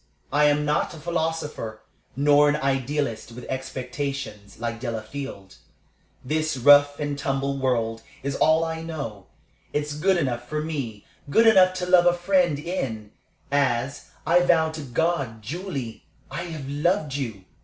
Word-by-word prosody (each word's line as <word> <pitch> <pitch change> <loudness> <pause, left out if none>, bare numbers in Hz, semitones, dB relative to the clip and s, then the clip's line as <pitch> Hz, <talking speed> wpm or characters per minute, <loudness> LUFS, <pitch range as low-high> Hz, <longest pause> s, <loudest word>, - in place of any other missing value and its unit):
I 150 +1 +5
am 150 0 +3
not 150 +3 0
a - - -10
philosopher, 160 -8 -3 0.3
nor 145 +2 +5
an 145 - +2
idealist, 135 -4 -1
with 125 +1 -9
expectations, 130 -5 -5
like 115 -1 -3
Delafield. 115 -3 -6 0.7
This 155 +1 0
rough 145 +2 +6
and 145 -1 -2
tumble 140 0 -1
world 115 -4 0 0.2
is 140 0 -2
all 160 +1 +4
I 160 0 -4
know. 140 - -6 0.5
It's 150 0 -1
good 180 +6 +2
enough 120 -6 -2
for 150 0 -2
me 135 -10 -4 0.2
good 225 +11 +5
enough 185 -4 +6
to 180 -1 -2
love 180 -1 +5
a 175 - +6
friend 175 -4 +2
in, 130 - -4 0.4
as 140 -1 0 0.2
I 170 +2 +5
vow 165 -3 +3
to 160 -1 -6
God, 135 -4 -1
Julie! 140 - -5 0.2
I 170 - -4
have 155 -5 -6
loved 150 +2 0
you. 115 -9 -4
145 Hz, 145 wpm, -25 LUFS, 125-160 Hz, 0.7 s, rough